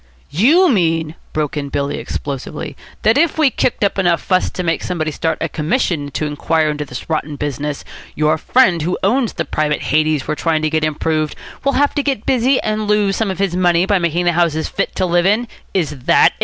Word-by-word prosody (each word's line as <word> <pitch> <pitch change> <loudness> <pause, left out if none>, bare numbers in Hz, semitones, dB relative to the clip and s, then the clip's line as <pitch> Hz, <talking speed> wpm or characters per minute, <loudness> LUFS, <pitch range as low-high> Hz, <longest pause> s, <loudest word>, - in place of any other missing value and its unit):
"You 295 - +5
mean," 165 - +1 0.2
broke 155 -1 -2
in 145 -1 -3
Billy 140 0 -2
explosively, 145 +2 -5 0.3
"that 225 +6 +4
if 330 0 +2
we 305 -4 +4
kick 230 - 0
up 200 0 +1
enough 175 -3 +2
fuss 185 -1 +1
to 180 - -5
make 165 -1 0
somebody 160 -3 -2
start 160 +1 -1
a 165 - 0
commission 155 - -1
to 150 +2 -2
inquire 155 +1 0
into 150 0 -4
this 125 -2 -8
rotten 155 -2 -2
business, 145 0 -4 0.3
your 155 +1 +1
friend 185 -8 +3
who 175 +4 -1
owns 235 +4 +1
the - - -3
private 150 -1 -1
Hades 155 -2 +1
we're 155 - 0
trying 155 0 0
to 155 - 0
get 155 -1 +1
improved, 155 0 -1 0.3
will 275 0 +2
have 285 +2 +2
to 290 - 0
get 270 -6 -2
busy 260 +1 +2
and 215 0 -2
lose 205 -2 +2
some 220 -3 0
of 190 - -3
his 195 -2 0
money 175 -1 +3
by 200 -1 +2
making 170 +1 0
the 175 - +4
houses 165 -2 +1
fit - - -3
to 185 - +1
live 175 +1 +2
in? 220 +4 +2 0.2
Is 175 -6 0
that - - +6
it?" - - -20
170 Hz, 215 wpm, -18 LUFS, 155-205 Hz, 0.3 s, that